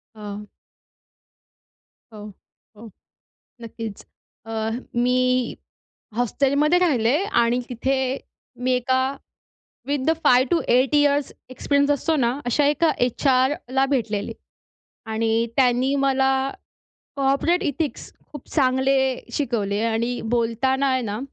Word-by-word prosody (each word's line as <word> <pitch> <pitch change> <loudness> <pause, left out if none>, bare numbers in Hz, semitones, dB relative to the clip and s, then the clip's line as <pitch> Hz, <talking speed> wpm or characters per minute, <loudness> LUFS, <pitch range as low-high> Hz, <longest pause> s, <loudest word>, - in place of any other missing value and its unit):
हां. 210 -1 -8 1.7
हो. 210 -1 -10 0.5
हो. 220 +1 -12 0.7
नक्कीच. 225 -2 -7 0.4
अ, 225 - -8 0.4
मी 255 0 +1 0.6
हॉस्टेलमध्ये 280 +7 +2
राहिले 260 -8 +2 0.3
आणि 235 +1 +1
तिथे 255 +2 -1 0.7
मी 255 - +1
एका 260 +1 +1 0.8
with 280 -2 -1
the 320 - +4
5 255 +1 +5
to 340 - +3
8 255 +4 +3
years 290 -1 +2 0.2
experience 280 +2 +1
असतो 315 +3 0
ना, 240 -5 +2
अशा 265 +4 +2
एका 300 +3 +2
एचआरला 260 +1 +1
भेटलेले 220 -3 -2 0.8
आणि 225 +1 0
त्यांनी 255 +1 +2
मला 265 0 +2 0.9
कॉर्पोरेट 280 +6 +1
एथिक्स 295 +1 -3 0.2
खूप 295 -3 -10
चांगले 265 -1 +2 0.4
शिकवले 215 -7 -1
आणि 230 +2 -1
बोलताना 250 +4 +1
आहे 260 0 +1
ना, 215 -2 -4
255 Hz, 105 wpm, -22 LUFS, 235-280 Hz, 1.7 s, 5